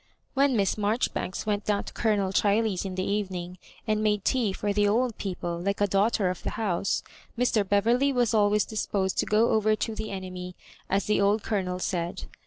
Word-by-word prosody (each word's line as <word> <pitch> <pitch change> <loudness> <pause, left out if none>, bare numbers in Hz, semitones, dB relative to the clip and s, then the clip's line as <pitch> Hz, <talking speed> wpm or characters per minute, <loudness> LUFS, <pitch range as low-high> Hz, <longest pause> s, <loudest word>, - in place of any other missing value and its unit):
When 275 -1 +3
Miss 200 +1 +1
Marjoribanks 210 -2 -1
went 205 -1 0
down 205 -1 +1
to - - -10
Colonel 205 -4 +1
Cbiley's 205 -1 +1
in 190 -1 -4
the 185 - -1
evening, 185 -3 -3 0.3
and 215 -1 0
made 210 -2 +1
tea 240 -6 +2
for 205 +1 -2
the 205 0 +3
old 230 +2 +1
people 175 -3 -3
like 200 +2 -1
a 205 - +4
daughter 200 0 +2
of 185 - -7
the - - -3
house, 195 -3 0 0.3
Mr. 235 -3 +2
Beverley 235 +7 +3
was 245 -4 +1
always 210 -1 +3
disposed 195 -3 -1
to - - +1
go 220 +2 +3
over 215 0 +3
to 215 +1 -3
the 215 0 -5
enemy, 185 -2 -6 0.3
as 195 +1 +1
the 210 -1 +2
old 205 +2 +2
Colonel 185 -4 -1
'said. 175 -1 -3
205 Hz, 190 wpm, -27 LUFS, 190-220 Hz, 0.3 s, a